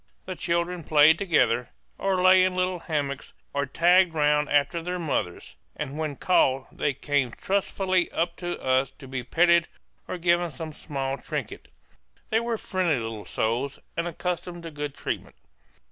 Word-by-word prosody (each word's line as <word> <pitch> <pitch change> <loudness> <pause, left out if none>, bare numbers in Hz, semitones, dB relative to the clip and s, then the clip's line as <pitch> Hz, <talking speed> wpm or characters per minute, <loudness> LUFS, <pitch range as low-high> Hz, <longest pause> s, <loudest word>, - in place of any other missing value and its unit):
The 185 - -4
children 170 0 -1
played 155 +2 +5
together, 125 - +2 0.3
or 190 -2 +1
lay 185 0 +7
in 185 0 +1
little 185 0 0
hammocks, 145 -5 -3 0.2
or 140 0 -1
tagged 175 +4 +4
round 150 -1 +2
after 145 +3 +2
their 180 +2 -3
mothers; 145 - -3 0.2
and 140 - -5
when 155 -2 -3
called 135 -5 +2
they 145 -3 -1
came 145 -3 0
trustfully 190 +3 0
up 170 +1 -1
to 175 -1 -4
us 130 0 +1
to 135 - -11
be 130 -1 -4
petted 170 +6 +3 0.4
or - - -4
given 175 0 +2
some 155 +2 -7
small 135 -3 -4
trinket; - - -5 0.6
they 220 - +4
were 235 -1 -2
friendly 185 -8 0
little 115 -2 -5
souls, 120 +5 -1 0.2
and 170 +1 -1
accustomed 175 0 -4
to 165 - -7
good 145 -1 -5
treatment. - - -5
160 Hz, 160 wpm, -26 LUFS, 140-180 Hz, 0.6 s, lay